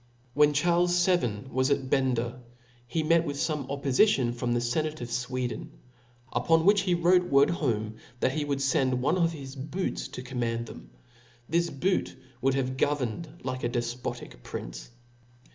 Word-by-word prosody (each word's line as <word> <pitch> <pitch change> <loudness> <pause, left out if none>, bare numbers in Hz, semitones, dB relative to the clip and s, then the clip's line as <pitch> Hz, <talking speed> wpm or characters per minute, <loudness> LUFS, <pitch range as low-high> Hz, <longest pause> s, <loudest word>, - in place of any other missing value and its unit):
When 150 +1 +5
Charles 175 +3 +3
XII. 120 - +1
was 130 +1 +1
at 140 -2 +1
Bender, 125 -2 +1 0.5
he 160 +6 -1
met 165 +1 +4
with 145 -3 -4
fome 150 -3 -1
oppofition 140 - +2
from 120 0 -2
the - - +2
fenate 155 +6 -1
of 120 -1 -6
Sweden; 125 0 -3 0.6
upon 160 +7 +3
which 200 0 +6
he 180 -2 +1
wrote 180 +1 +4
word 140 +3 +5
home, 110 -9 -1 0.2
that 130 - +2
he 150 +2 -1
would 140 -1 -1
fend 130 -2 +2
one 145 - +3
of 165 -1 +3
his 135 -3 -8
boots 155 +8 -3
to 125 - -8
command 120 -2 -2
them. - - -11 0.6
This 170 +2 +1
boot 180 +7 -1 0.3
,would 135 +1 +2
have 130 -1 -1
governed 145 +2 -1
like 130 0 -4
a 120 - +1
defpotic 120 - -4
prince. - - -7
135 Hz, 160 wpm, -28 LUFS, 125-160 Hz, 0.6 s, which